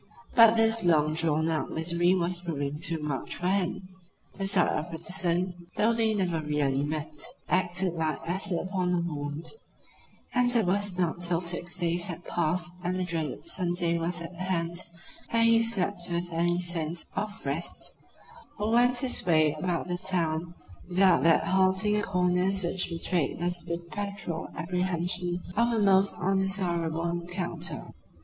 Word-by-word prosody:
But 230 -1 +7
this 225 -1 +3
long 155 -3 +3
drawn 160 0 +1
out 160 -1 -1
misery 170 +2 +1
was 175 0 0
proving 145 -5 -4
too 165 +2 0
much 145 -3 -3
for 180 - -3
him. 190 -1 -1 0.5
The 195 0 -3
sight 195 - +4
of 155 +3 -3
Brotherson, 175 +1 -2
though 225 +2 +2
they 225 -1 +1
never 175 -5 -1
really 145 -3 0
met, 150 0 -2 0.3
acted 180 0 +1
like 160 -2 -2
acid 185 +1 0
upon 185 -1 -1
a - - 0
wound, 150 -1 -4 0.9
and 245 0 +3
it 225 -4 +3
was 195 0 +2
not 175 -1 -1
till 170 -1 +2
six 175 +1 -2
days 175 -1 +2
had 175 0 -6
passed 175 +1 -1
and 185 +1 -2
the - - 0
dreaded 165 - -3
Sunday 175 - +1
was 170 +1 -1
at 165 +2 -7
hand, 175 -1 -1 0.5
that 230 -1 +3
he 230 0 +5
slept 200 -5 0
with 175 0 -2
any 175 +1 +1
sense 170 -2 0
of 210 -2 -4
rest 145 +5 -1 0.6
or 210 +2 -2
went 245 +1 +4
his 260 -2 +2
way 155 -3 +3
about 170 +3 -3
the 175 0 -2
town 170 -2 0 0.3
without 185 0 +4
that 165 - +5
halting 190 +2 +2
at - - 0
the - - -4
corners 180 +1 +2
which 180 +1 0
betrayed 170 -1 -1
his 175 0 -1
perpetual 170 +1 -5
apprehension 180 +1 -1
of 235 +2 +2
a 230 - 0
most 195 -1 +3
undesirable 180 -3 0
encounter. 175 +2 -4
175 Hz, 155 wpm, -27 LUFS, 165-190 Hz, 0.9 s, But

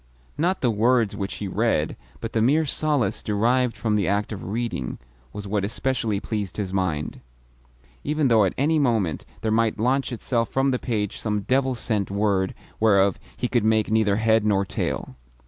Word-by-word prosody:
Not 180 +5 0
the 125 - +3
words 115 0 +2
which 100 -1 -4
he 100 - -4
read, 95 -6 0 0.3
but 115 - -5
the 110 - +2
mere 150 +7 +3
solace 145 -7 0
derived 120 +4 +1
from 110 -2 0
the 105 -3 +1
act 100 +2 0
of 105 - -6
reading, 105 - -3 0.3
was 105 0 -7
what 100 0 -1
especially 115 -1 -1
pleased 105 -3 -4
his 95 -3 -3
mind; 85 -6 -2 0.8
even 150 -1 +1
though 115 -3 +5
at 95 - -2
any 155 +4 +2
moment 110 - 0 0.2
there 110 - 0
might 115 0 +2
launch 130 +5 +1
itself 115 -1 -1
from 135 +1 +1
the 125 - 0
page 105 -5 -2
some 105 -2 -1
devil 130 +3 +1
sent 110 -4 -1
word 100 -2 0 0.2
whereof 100 -3 +4 0.2
he 125 - -1
could 120 -3 +1
make 110 -1 +2
neither 110 -2 +3
head 110 0 +3
nor 100 -2 +2
tail. 65 - -3
110 Hz, 180 wpm, -24 LUFS, 100-125 Hz, 0.8 s, though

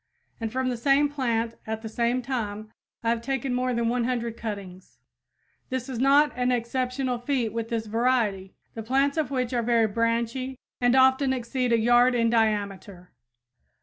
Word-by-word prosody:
And 225 -1 -3
from 260 +1 -1
the 245 - -2
same 280 +4 +3
plant 235 -5 -1
at 220 0 -4
the - - -4
same 235 +3 0
time 215 -4 -4 0.3
I 230 - +1
have 230 0 0
taken 270 0 -2
more 250 0 0
than 235 -1 0
100 235 -1 -1
cuttings. 200 -5 -7 0.7
This 255 0 -3
is 250 -3 -4
not 280 +3 +5
an 250 0 +1
exceptional 250 +1 -1
feat 245 -4 -1
with 230 0 -3
this 230 -2 -2
variety, 220 -4 0 0.2
the 225 - -6
plants 270 +5 +1
of 315 -2 -1
which 255 -3 -2
are 240 - +1
very 230 -1 +3
branchy 230 +4 -1 0.2
and 245 +1 +4
often 265 +1 +4
exceed 250 0 -2
a 230 - +5
yard 240 +2 +4
in 230 -1 +2
diameter. 205 -5 -1
240 Hz, 170 wpm, -26 LUFS, 225-255 Hz, 0.7 s, not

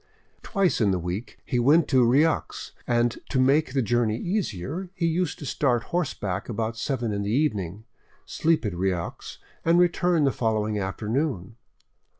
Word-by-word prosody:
Twice 195 - 0
in 105 - +4
the 95 - +1
week 90 +6 -5
he 125 - 0
went 145 +6 +4
to 130 -3 +4
Rieux, 140 +7 +1 0.2
and 120 0 +2
to 130 - 0
make 140 +3 +3
the 135 -2 +1
journey 115 0 +1
easier, 175 - -3
used 170 -1 0
to 145 - -8
start 125 -4 +1
horseback 105 - -2
about 115 0 -2
seven 120 -2 -2
in 100 - -2
the 100 - -2
evening, 105 - -1 0.4
sleep 160 -5 +1
at 105 - -1
Rieux, 90 -1 -3 0.3
and 165 +1 +4
return 175 -2 +3
the 135 - +3
following 110 -3 -1
afternoon. 110 - -2
120 Hz, 150 wpm, -25 LUFS, 105-155 Hz, 0.4 s, in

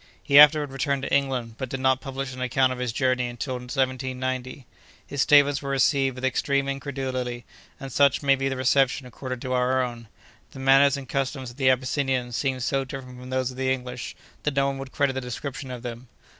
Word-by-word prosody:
He 140 0 +6
afterward 150 -1 +7
returned 135 0 -1
to - - -3
England, 130 -5 0
but 130 -2 -4
did 135 - -4
not 130 0 +2
publish 135 -1 -5
an 130 - -8
account 130 +1 +2
of 125 - -8
his 125 -2 -1
journeys 130 0 0
until 120 +3 -4
1790. 130 0 -3 0.4
His 140 - -2
statements 145 -1 +5
were 140 - -5
received 135 -1 +2
with 130 +1 -4
extreme 140 +2 0
incredulity, 130 -3 -4 0.3
and 135 -1 -7
such 140 0 +3
may 140 -1 +5
be 135 0 0
the 135 - -3
reception 130 +1 +2
accorded 125 0 -7
to 130 - -2
our 130 +1 +2
own. 120 -2 -6 0.5
The - - -10
manners 135 +1 +5
and 135 -2 -8
customs 130 -1 -3
of 120 - -18
the 135 -2 +3
Abyssinians 130 -1 0
seemed 130 -2 -1
so 135 +1 0
different 130 -1 -9
from 125 0 -10
those 130 0 -1
of 125 - -12
the 130 0 0
English, 125 -1 -4 0.3
that 150 -2 -2
no 140 0 +3
one 135 0 -2
would 135 -1 -7
credit 140 -3 +1
the 130 - -3
description 130 +2 -6
of 125 -1 -7
them. 120 +1 -7
130 Hz, 210 wpm, -25 LUFS, 125-135 Hz, 0.5 s, afterward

